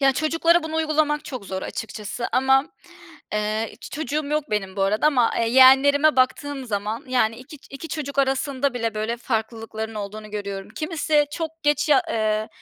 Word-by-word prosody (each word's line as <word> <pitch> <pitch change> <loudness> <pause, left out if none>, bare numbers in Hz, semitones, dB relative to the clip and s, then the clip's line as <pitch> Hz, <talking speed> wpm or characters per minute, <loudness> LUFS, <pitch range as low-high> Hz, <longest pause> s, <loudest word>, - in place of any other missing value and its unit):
Ya, 270 -1 +4
çocuklara 330 +4 +2
bunu 320 0 -4
uygulamak 310 -1 +1
çok 255 -7 -7
zor 190 0 -4
açıkçası 220 +1 -5
ama 265 +1 +4
m - - -18 0.7
eee, 215 +1 -1
hiç 230 - -12
çocuğum 300 0 -2
yok 300 0 -2
benim 195 -2 -2
bu 195 - 0
arada 210 +7 +2
ama, 255 -6 +3
eee, 230 -1 +1
yeğenlerime 270 +4 +6
baktığım 270 +2 0
zaman, 215 +4 -3
yani, 230 -3 +1
2 260 +4 -12
ç - - -20
2 275 +4 -8
çocuk 285 -3 -5
arasında 270 0 0
bile, 230 -2 -2
böyle, 215 +2 -2
farklılıkların 225 -1 -4
olduğunu 210 +1 -7
görüyorum. 200 -2 -5
Kimisi 305 -1 +1
çok 325 0 -5
geç 295 +1 +1
ya 300 +5 +5
eee, 215 -1 0
260 Hz, 175 wpm, -23 LUFS, 220-295 Hz, 0.7 s, yeğenlerime